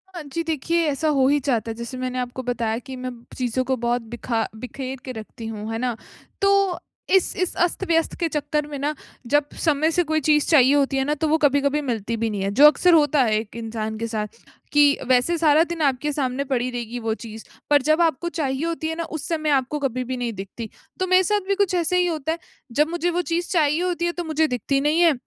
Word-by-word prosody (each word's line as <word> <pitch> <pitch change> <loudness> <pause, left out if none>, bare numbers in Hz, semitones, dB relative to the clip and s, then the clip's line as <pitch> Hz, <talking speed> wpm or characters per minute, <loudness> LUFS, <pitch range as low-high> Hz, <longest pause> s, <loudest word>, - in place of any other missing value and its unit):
हाँ 345 - -5
जी, 300 +4 -4
देखिए 330 +2 0
ऐसा 290 +2 -1
हो 260 -1 +4
ही 290 +1 +3
जाता 235 -5 0
है। - - -6
जैसे 235 +2 -6
मैंने 255 0 -3
आपको 250 +1 -4
बताया 230 -2 -1
कि 260 +1 -9
मैं 255 0 -5 0.3
चीज़ों 255 0 0
को 260 +1 0
बहुत 240 +1 0
बिखा 235 -1 -1
बिखेर 255 +3 -6
के 255 - -5
रखती 225 0 -9
हूँ, 215 0 -5
है 225 - -2
ना? 245 -1 -1 0.5
तो 395 -2 +3 0.4
इस 380 - +2
इस 365 - 0
अस्त-व्यस्त 340 -2 0
के 340 - +1
चक्कर 300 0 -1
में 295 -1 -6
ना, 290 +2 -1 0.3
जब 290 +3 +3 0.2
समय 310 0 +2
से 355 +2 +2
कोई 315 -1 0
चीज़ 300 +1 +3
चाहिए 275 -4 +6
होती 275 -1 +2
है 270 - +2
ना, 295 +2 0
तो 315 +2 -1
वो 315 +1 +3
कभी-कभी 285 0 +2
मिलती 230 -4 -2
भी 225 0 -1
नहीं 205 -2 -3
है। 195 - -1
जो 280 +8 +8
अक्सर 340 +4 +4
होता 295 -2 +4
है, 220 -3 +2
एक 220 +1 -9
इंसान 220 -1 -4
के 230 +1 -3
साथ, 215 -2 -2 0.5
कि 290 -1 +5
वैसे 255 +7 +3
सारा 310 -1 +5
दिन 340 -1 -5
आपके 280 +1 +1
सामने 270 -1 -1
पड़ी 250 -1 +1
रहेगी 240 0 -5
वो 225 -1 -1
चीज़, 220 -1 -9 0.2
पर 290 -1 +5
जब 310 +4 +2
आपको 335 +1 +1
चाहिए 285 -3 -2
होती 330 -1 -2
है 320 - -2
ना, 335 - -3
उस 315 -2 -6
समय 310 -2 -1
आपको 275 +1 +1
कभी 255 -3 -1
भी 255 +1 -4
नहीं 240 -2 -2
दिखती। 200 +3 -7 0.3
तो 370 - 0
मेरे 370 +1 +5
साथ 410 +1 0
भी 395 - +2
कुछ 400 -2 +1
ऐसा 350 0 +1
ही 360 0 +3
होता 320 -2 -1
है। 330 - -2 0.3
जब 300 +6 +2
मुझे 345 +1 -1
वो 350 +1 0
चीज़ 345 +1 -1
चाहिए 310 -1 +2
होती 345 -1 -1
है, 345 - +1
तो 350 0 -5
मुझे 315 -1 +1
दिखती 255 +1 0
नहीं 300 +4 +2
है 335 -3 +6
285 Hz, 240 wpm, -23 LUFS, 245-325 Hz, 0.5 s, जो